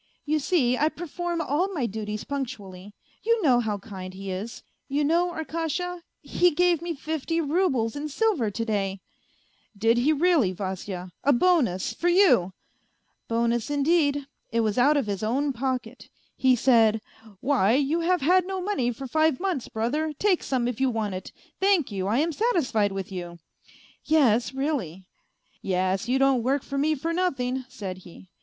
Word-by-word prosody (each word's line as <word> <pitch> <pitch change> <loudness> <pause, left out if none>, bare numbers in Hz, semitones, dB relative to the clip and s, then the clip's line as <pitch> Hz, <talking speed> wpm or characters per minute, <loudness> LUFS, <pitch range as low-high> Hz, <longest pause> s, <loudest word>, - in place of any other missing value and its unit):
You 310 +1 +1
see, 280 -5 +1
I 305 - +3
perform 345 +1 -4
all 335 +7 0
my 275 -6 0
duties 215 -1 -4
punctually; 210 -8 -6 0.3
you 465 +1 +2
know 255 -5 +5
how 215 -3 -1
kind 190 -2 -9
he 195 0 -6
is, 205 +6 -6 0.2
you 285 +2 0
know, 340 +4 +2
Arkasha, 335 +2 -3 0.2
he 355 - +3
gave 350 0 +2
me 340 -1 -3
fifty 315 +3 -2
roubles 290 -8 +1
in 295 +1 -4
silver 310 - +1
to 230 +3 -3
day 200 -3 -1
1 195 - -12 0.3
" - - -38
" 210 - -30
Did 225 +3 +3
he 275 +6 +3
really, 310 - +3
Vasya? 185 -1 -5
A 285 - +4
bonus 240 - +2
for 345 +9 0
you? 345 - +4 0.3
" - - -45
" - - -47
Bonus, 235 +2 0
indeed, 290 -1 +2 0.2
it 230 - +1
was 215 +1 0
out 290 +4 +4
of 275 - 0
his 200 -2 -3
own 270 +6 0
pocket. 255 -1 -4 0.3
He 260 -1 +4
said: 225 -3 +4 0.2
' 215 -4 -19
Why, 245 -6 +2
you 290 +4 +1
have 355 +1 +1
had 365 +5 +3
no 385 0 -3
money 360 -11 -1
for 270 +3 -7
five 315 +1 +2
months, 360 -9 -2
brother, 295 +8 -1
take 395 -4 +2
some 250 -3 -1
if 245 +1 -4
you 265 - +3
want 220 -4 -2
it; 185 - -7 0.3
thank 380 - +2
you, 190 -1 -2
I 215 +4 +1
am 320 +4 +1
satisfied 290 - +1
with 195 0 -5
you.'... 175 -2 -6 0.7
Yes, 245 -8 +3
really! 265 - -3 0.3
' - - -50 0.2
Yes, 190 +3 -1
you 260 - +3
don't 270 -2 +3
work 265 +3 0
for 275 - -3
me 310 +2 +2
for 330 +4 -3
nothing,' 265 -8 -1
said 195 -7 -6
he. 180 0 -15
265 Hz, 185 wpm, -26 LUFS, 215-320 Hz, 0.7 s, know